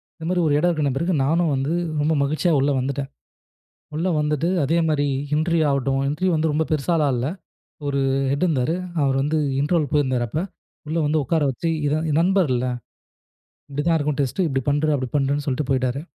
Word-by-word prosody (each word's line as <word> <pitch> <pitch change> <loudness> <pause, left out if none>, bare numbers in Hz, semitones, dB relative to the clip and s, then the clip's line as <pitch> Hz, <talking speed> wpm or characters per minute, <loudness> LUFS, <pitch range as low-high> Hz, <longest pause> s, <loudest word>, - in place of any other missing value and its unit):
இந்த 160 - -9
மாரி 180 -1 +1
ஒரு 145 - +2
இடம் 175 +3 +2
இருக்குன 150 -4 0
பிறகு 170 +6 0
நானும் 165 +1 +2
வந்து 135 +5 -1 0.3
ரொம்ப 155 +2 +2
மகிழ்ச்சியா 155 +5 0
உள்ள 140 +1 +2
வந்துட்டேன். 135 +1 -3 0.9
உள்ள 170 +4 -1
வந்துட்டு 150 +2 0
அதே 165 +5 +1
மாரி 145 -1 +1 0.3
இன்டர்வியூ 160 0 +2
ஆகட்டும். 135 0 0
இன்டர்வியூ 180 +5 0
வந்து 155 0 +1
ரொம்ப 160 +1 +1
பெருசாலா 155 0 +1
இல்ல. 120 +2 -1 0.6
ஒரு 140 -1 0 0.3
ஹெட் 140 +6 0
இருந்தாரு. 155 0 0 0.3
அவர் 135 -1 +1
வந்து 150 +3 0 0.2
இன்டர்வல் 150 -2 0
போயிருந்தேன் 130 -4 +1
அப்ப 150 - -3 0.5
உள்ள 160 - -2
வந்து 150 0 +1
உக்கார 160 +1 +1
வச்சு 165 +6 -3 0.2
இதான் 155 +2 0
இது 150 - +1
நண்பர்ல 170 -10 +2 1.1
இப்டி 145 +1 -2
தான் 165 - +4
இருக்கும். 150 -1 -1
டெஸ்ட் 140 +8 -1
இப்டி 135 -3 -1
பண்று 145 +2 +1
அப்டி 130 -2 -3
பண்றுன்னு 140 +1 0
சொல்ட்டு 135 0 -1
போயிட்டாரு. 130 +1 0
150 Hz, 180 wpm, -22 LUFS, 135-160 Hz, 1.1 s, தான்